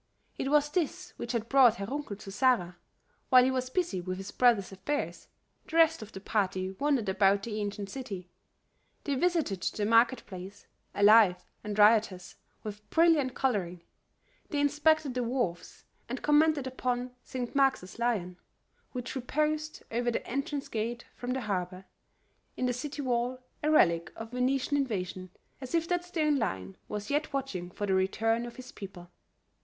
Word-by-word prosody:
It 270 - -2
was 295 0 +3
this 360 +2 -2
which 235 - -4
had 230 -1 -1
brought 255 -3 +6
Herr 200 - -4
Runkel 275 -2 -4
to 195 -1 -9
Zara. 195 -7 +2 0.5
While 255 -2 +8
he 260 - +2
was 255 -1 -2
busy 335 - -1
with 185 +1 -4
his 195 +1 -7
brother's 235 -7 +3
affairs, 240 +10 -3 0.4
the 320 - -7
rest 325 -3 +5
of 215 0 -9
the 190 - -8
party 190 -2 -1
wandered 280 -7 +1
about 195 +1 +3
the 215 -1 -3
ancient 205 0 -4
city; 200 -9 -6 0.8
they 285 - -1
visited 310 - 0
the 205 - -1
market 230 +3 +4
place, 190 +1 -9 0.3
alive 205 -3 +6 0.2
and 210 -1 -4
riotous 210 -4 +4 0.3
with 210 0 -8
brilliant 320 -6 +3
coloring; 185 -10 -1 0.7
they 295 - -1
inspected 295 0 +2
the 250 - -1
wharves, 235 -9 -3 0.3
and 255 - -5
commented 300 -1 +4
upon 250 -1 -2
St. 250 -2 -5
Mark's 265 -9 +1
Lion, 200 -7 -1 0.6
which 250 0 -5
reposed 305 +4 -1
over 240 +1 0
the 235 - -2
entrance 275 +2 -3
gate 235 +2 -3
from 245 - -6
the 265 - -2
harbor, 185 -3 -3 0.7
in 255 - 0
the 250 - +1
city 285 +4 -5
wall, 245 0 0 0.2
a 300 - +1
relic 170 - +4
of 225 0 -8
Venetian 260 +3 +1
invasion, 185 -8 -3 0.3
as 260 +5 -4
if 330 0 +1
that 355 -1 +1
stone 310 -5 +1
lion 95 - -3
was 210 +4 -5
yet 295 +2 0
watching 255 -11 -3
for 205 +3 -4
the 195 - +1
return 225 +5 +1
of 235 - -10
his 255 0 -10
people. 180 -3 -10
240 Hz, 165 wpm, -30 LUFS, 200-275 Hz, 0.8 s, While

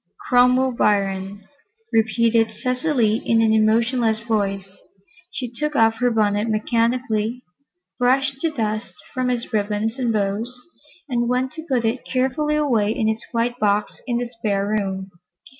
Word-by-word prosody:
"Cromwell 250 +1 +4
Biron," 200 -3 0 0.5
repeated 225 0 +3
Cecily, 250 0 0
in 230 -1 +1
an 220 -1 +3
emotionless 225 +1 +2
voice. 195 -4 -2 0.5
She 250 - -4
took 295 +5 -3
off 225 -2 +4
her 250 +1 +2
bonnet 210 -1 +1
mechanically, 230 +1 0 0.6
brushed 265 +2 +2
the 330 - +1
dust 215 -6 -3 0.2
from 255 -1 -1
its 245 -1 -3
ribbons 215 +3 -1
and 245 -3 +1
bows 215 +4 -2 0.5
and 240 -3 0
went 255 +1 0
to 320 0 -9
put 245 -3 +1
it 230 +3 -1
carefully 265 +4 0
away 240 -9 +2
in 220 -1 0
its 220 +1 -1
white 240 0 -1
box 210 0 0
in 240 -2 0
the 245 - -1
spare 215 -3 -2
bedroom. 190 -2 -3
230 Hz, 140 wpm, -22 LUFS, 215-250 Hz, 0.6 s, Cromwell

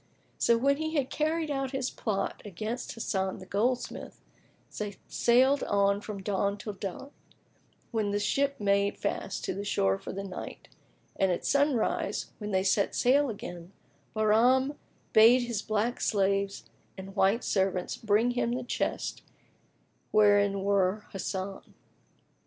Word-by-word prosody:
So, 235 - +4
when 280 +4 +2
he 315 +1 -3
had 275 -3 0
carried 315 0 0
out 270 -1 -2
his 265 -1 -1
plot 210 -4 -2
against 215 +5 -5
Hasan 190 -4 -2
the 190 - -10
goldsmith, 235 +6 -2 0.6
they 205 -2 -4
sailed 260 +4 +3
on 200 0 +2
from 205 -2 -7
dawn 200 0 0
till 210 +1 -6
dark, 195 +8 -6 0.8
when 220 -3 0
the 205 0 0
ship 275 +7 0
made 200 0 +1
fast 200 -1 -3
to - - -2
the 200 +2 -4
shore 95 - +1
for - - -7
the 195 +1 -5
night, 190 -2 -8 0.5
and 190 -1 +2
at 175 - -2
sunrise, 280 -5 +1
when 210 -1 -5
they 190 -2 +1
set 195 +1 +1
sail 275 +3 +3
again, 180 -4 -8 0.4
Bahram 240 +6 +3 0.4
bade 235 +3 +7
his 235 -4 -2
black 215 +4 -1
slaves 195 -1 0 0.3
and 190 +1 -9
white 200 +4 +3
servants 190 -2 0
bring 220 +3 +2
him 240 -1 0
the 255 +1 -2
chest 245 - -2 0.9
wherein 205 -2 +4
were 200 +1 +1
Hasan. 195 0 -5
210 Hz, 140 wpm, -29 LUFS, 195-245 Hz, 0.9 s, bade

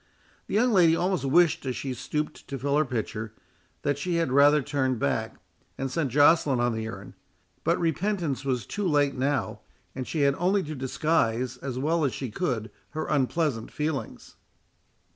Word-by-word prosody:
The - - -3
young 245 +3 +3
lady 170 -4 +5
almost 180 -2 0
wished, 165 +4 +3
as 130 - -1
she 135 -2 -3
stooped 150 +4 -4
to 140 - -4
fill 140 +2 0
her 155 +1 +3
pitcher, 110 -3 -4 0.5
that 145 -1 0
she 175 +2 -1
had 165 -5 0
rather 145 +2 +5
turned 130 -3 0
back, 70 - -1 0.4
and 135 -1 -3
sent 140 -2 -1
Joceline 145 -1 +4
on 120 0 +1
the 110 0 -3
errand; 110 - -8 0.5
but - - +2
repentance 170 -3 -1
was 125 -5 -1
too 205 - -2
late 145 -3 +2
now, 135 +2 -1 0.3
and 130 -1 -5
she 155 - -2
had 140 -1 +4
only 190 +3 +2
to 155 - -5
disguise 130 -3 0
as 130 0 -5
well 160 +5 +1
as 135 - 0
she 130 -5 -5
could 115 -6 -2 0.3
her 155 - -1
unpleasant 140 -3 0
feelings. 150 -2 -4
140 Hz, 175 wpm, -27 LUFS, 130-160 Hz, 0.5 s, lady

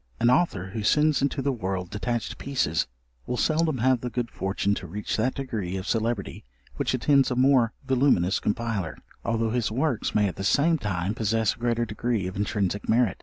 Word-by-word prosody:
An 120 +1 +4
author 120 - +1
who 110 +3 -4
sends 150 +6 +3
into 140 0 0
the 140 - +1
world 95 -6 -3
detached 115 +2 -3
pieces 125 - 0 0.4
will 125 - -2
seldom 155 -1 +1
have 125 0 +2
the 125 - -3
good 120 -1 -3
fortune 95 +1 -1
to 95 -2 -5
reach 105 +5 -3
that 125 +4 0
degree 110 -9 -3
of 95 - -5
celebrity 115 -3 -1 0.3
which - - 0
attends 140 +2 +3
a 125 - -1
more 125 -3 +4
voluminous 130 -9 +3
compiler, 105 -5 -2 0.3
although 115 -1 0
his 120 -2 0
works 125 -1 -1
may 105 -1 +4
at 95 - -5
the 95 - -4
same 155 +10 +3
time 95 -2 -2
possess 110 -1 +1
a - - -18
greater 120 0 0
degree 110 -1 -2
of 95 +1 -5
intrinsic 100 -1 -1
merit. 115 -3 +2
115 Hz, 190 wpm, -26 LUFS, 100-130 Hz, 0.4 s, An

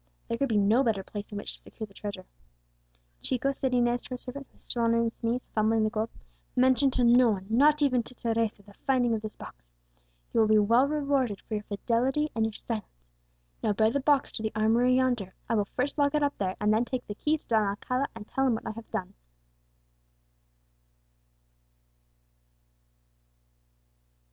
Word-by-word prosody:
There 230 - -2
could 275 -1 +1
be 220 - +2
no 210 +5 +4
better 215 -6 0
place 205 +2 -7
in 205 - -5
which 205 - -6
to - - -22
secure 220 - -8
the 200 - -21
treasure. 200 -2 -7 1.0
"Chico," 260 +2 0
said 265 -1 -2
Inez 245 -1 +2
to - - -14
her 250 - -4
servant, 265 +3 -8
who - - -33
was - - -27
still 240 - -3
on 230 0 +3
his 230 0 +1
knees, 235 +2 -1
fumbling 220 0 +2
the 215 - +1
gold, 220 +1 -1 0.5
"mention 260 +2 +4
to 255 -1 0
no 240 0 +6
one 195 -3 -2
not 295 +5 +4
even 255 -4 +3
to 250 +2 -13
Teresa 225 -3 -1
the 205 - -17
finding 250 -3 +3
of 220 - -1
this 215 -1 -7
box. - - -12 0.6
You - - +2
shall 220 - +5
be 215 0 +5
well 230 +6 +4
rewarded 280 -7 0
for - - -8
your 210 -1 -2
fidelity 255 +8 0
and 225 - 0
your 220 - -3
silence. 130 - -7 0.5
Now 215 - +1
bear 220 +2 +3
the 280 - 0
box 285 0 +2
to - - -6
the 220 0 -2
armoury 230 +4 +3
yonder; 245 -7 0
I 230 - -1
will 210 -2 +2
first 275 +4 -1
lock 285 +1 +3
it 300 - +2
up 285 0 0
there, 185 -2 -1
and 210 0 +2
then 220 +2 +3
take 250 0 -4
the 205 - -5
key 305 +9 0
to - - -30
Don 220 -3 +2
Alcala, 250 +7 -1
and 220 -2 -9
tell 270 0 0
him 240 - +2
what - - -7
I - - -3
have 225 0 -10
done." 185 - -4
230 Hz, 200 wpm, -28 LUFS, 215-255 Hz, 1.0 s, no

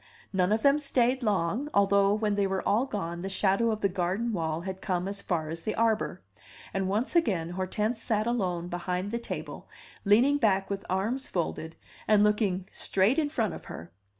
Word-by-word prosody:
None 185 0 +2
of 220 +1 +1
them 280 +1 +5
stayed 260 -2 +1
long, 210 - 0
although 200 0 +4
when 210 -1 0
they 200 -1 +1
were 190 0 -2
all 235 +6 +2
gone 175 -7 -4
the 190 - -4
shadow 195 +4 +2
of 215 -1 -2
the 200 - +3
garden 190 +5 -1
wall 160 -3 -2
had 190 +1 -6
come 180 -2 -1
as 200 0 -4
far 160 -4 -2
as 165 +1 -4
the 215 - -3
arbor; 225 - 0 0.5
and 195 -1 -1
once 220 - -1
again 185 - +1
Hortense 210 +5 -2
sat 215 -1 0
alone 185 -8 -1
behind 180 +2 -3
the 235 - -1
table, 235 - -7 0.3
leaning 245 +8 +4
back 195 -4 +2
with 195 0 -3
arms 220 +8 -1
folded, 160 -2 -3 0.3
and 210 -1 +5
looking 205 -3 +1
straight 200 +10 +2
in 300 -2 0
front 225 - -1
of - - -9
her. 80 +1 -9
200 Hz, 190 wpm, -28 LUFS, 185-225 Hz, 0.5 s, them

